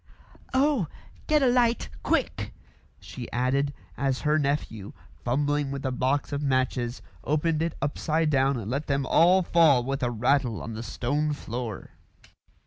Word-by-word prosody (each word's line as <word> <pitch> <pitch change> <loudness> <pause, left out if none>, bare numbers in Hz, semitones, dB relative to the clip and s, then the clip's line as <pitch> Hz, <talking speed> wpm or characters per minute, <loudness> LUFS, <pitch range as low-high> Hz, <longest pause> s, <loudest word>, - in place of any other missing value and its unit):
"Oh! 270 - +3 0.4
get 300 -2 +3
a - - +5
light 245 -1 +2
quick!" - - -1 0.4
she 125 -3 -9
added, 135 +3 +1 0.2
as 135 -2 -1
her 150 0 +2
nephew, 140 -8 -2 0.3
fumbling 145 +3 0
with 140 0 -5
a 130 - 0
box 130 +3 0
of 140 - -1
matches, 130 -3 0 0.2
opened 155 +2 +1
it 165 0 -1
upside 155 +2 0
down 135 -1 +2
and 110 -4 -5
let 140 +4 -2
them 140 -1 0
all 180 +6 +5
fall 160 -7 +4
with 135 +2 -3
a 120 - +1
rattle 120 0 +1
on - - -6
to 110 - -6
the - - -4
stone 145 +6 -1
floor. 120 -5 -6
140 Hz, 155 wpm, -27 LUFS, 125-155 Hz, 0.4 s, a